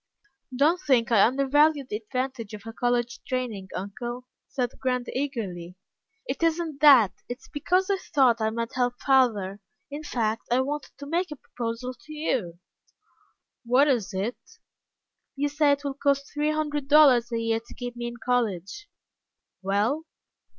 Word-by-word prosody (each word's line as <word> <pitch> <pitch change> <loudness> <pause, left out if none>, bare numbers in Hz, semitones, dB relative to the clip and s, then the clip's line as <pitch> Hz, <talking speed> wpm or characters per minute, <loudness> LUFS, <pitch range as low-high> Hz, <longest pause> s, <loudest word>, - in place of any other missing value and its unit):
"Don't 315 +7 +3
think 245 -7 +2
I 215 -4 +6
undervalue 280 +3 +3
the 210 - -3
advantage 235 -1 -4
of 205 - -12
a 225 - -7
college 245 0 0
training, 240 -7 -3
uncle," 240 +7 -5 0.2
said 250 -3 -2
Grant, 250 -1 -1
eagerly. 200 -11 -4 0.5
"It - - -4
isn't 325 -3 0
that. 265 -10 +8 0.2
It's 245 +2 -7
because 360 +6 0
I 395 - +2
thought 255 -10 +2
I 220 - +2
might 230 +1 -4
help 245 -1 0
father. 220 -8 +2 0.3
In 290 +2 -5
fact, 225 -7 -2
I 245 +2 +3
wanted 290 +2 -4
to 285 - -8
make 345 +5 -1
a 300 - -6
proposal 245 -1 -5
to 280 +5 -13
you." 250 - -2 1.1
"What 250 +4 +4
is 235 -8 +1
it?" 200 +5 -3 1.0
"You 285 +1 0
say 295 0 +3
it 285 - -4
will 280 -1 -2
cost 280 0 0
three 295 +1 0
hundred 295 -2 -2
dollars 275 -5 +6
a 230 - 0
year 230 0 0
to 230 - -15
keep 245 -1 -6
me 240 0 -4
in 240 - -6
college?" 235 - -1 0.7
"Well?" 210 +11 0
250 Hz, 155 wpm, -26 LUFS, 230-290 Hz, 1.1 s, that